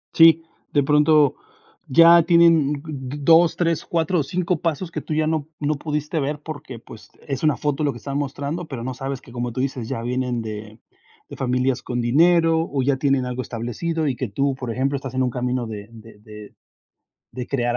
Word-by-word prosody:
Sí, 165 0 +7 0.3
de 145 - +2
pronto 150 0 +4 0.5
ya 170 +4 +7
tienen 165 -3 +4
mm, 140 -1 -6
2, 165 +2 +5
3, 170 -2 0
4 170 +1 0
o - - +1
5 175 +2 -2
pasos 170 +1 -2
que - - -4
tú 155 - -5
ya 155 0 +1
no 155 -2 -1
no 150 +1 0
pudiste 150 +1 -3
ver, 145 +1 -2
porque 145 -5 -8
pues, 110 -1 -14 0.2
es 135 -3 -3
una 150 -2 +2
foto 145 0 -1
lo 145 - +1
que - - -9
están 140 +4 -4
mostrando, 145 +4 -4
pero 125 -6 -6
no 130 +1 -4
sabes 135 +1 -5
que 125 - -16
como 120 0 -3
tú 115 - -6
dices: 130 -3 -3
"Ya 115 - -3
vienen 125 0 -2
de 110 0 -8 0.5
de - - -8
familias 125 0 0
con 125 0 -4
dinero 165 +5 +3
o 135 -2 0
ya 135 0 +1
tienen 135 -2 +1
algo 125 0 -3
establecido", 130 +8 -3
y 135 - 0
que 120 -1 -4
tú 135 +7 0
por 125 -3 -5
ejemplo 135 +4 -1
estás 135 -1 -7
en 130 - +1
un 125 - 0
camino 125 0 -2
de 105 -1 -8
de 115 -2 -14
de 105 0 -12 0.8
de 125 0 -6
crear 120 -3 -1
140 Hz, 205 wpm, -22 LUFS, 125-155 Hz, 0.8 s, Sí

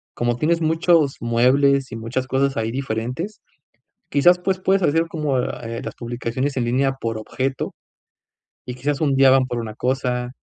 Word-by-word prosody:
como 120 0 0
tienes 165 +3 +1
muchos 160 -2 +2
muebles 130 +3 +3
y 115 - -5
muchas 115 +3 -3
cosas 135 +1 +1
ahí 115 0 -1
diferentes, 130 - -4 0.7
quizás 175 +5 +5
pues 185 +1 -1
puedes 190 0 +2
hacer 165 +1 +2
como, 150 -5 -1
eh, 115 -1 -5
las - - -6
publicaciones 120 +3 -3
en 125 - 0
línea 135 +3 +1
por 115 -1 -2
objeto 130 +4 -3 0.9
y 125 - -6
quizás 140 +3 -2
un 140 -3 +2
día 135 0 +6
van 130 -1 +4
por 120 -2 -3
una 110 -2 -5
cosa, 125 0 -1
135 Hz, 165 wpm, -21 LUFS, 120-145 Hz, 0.9 s, día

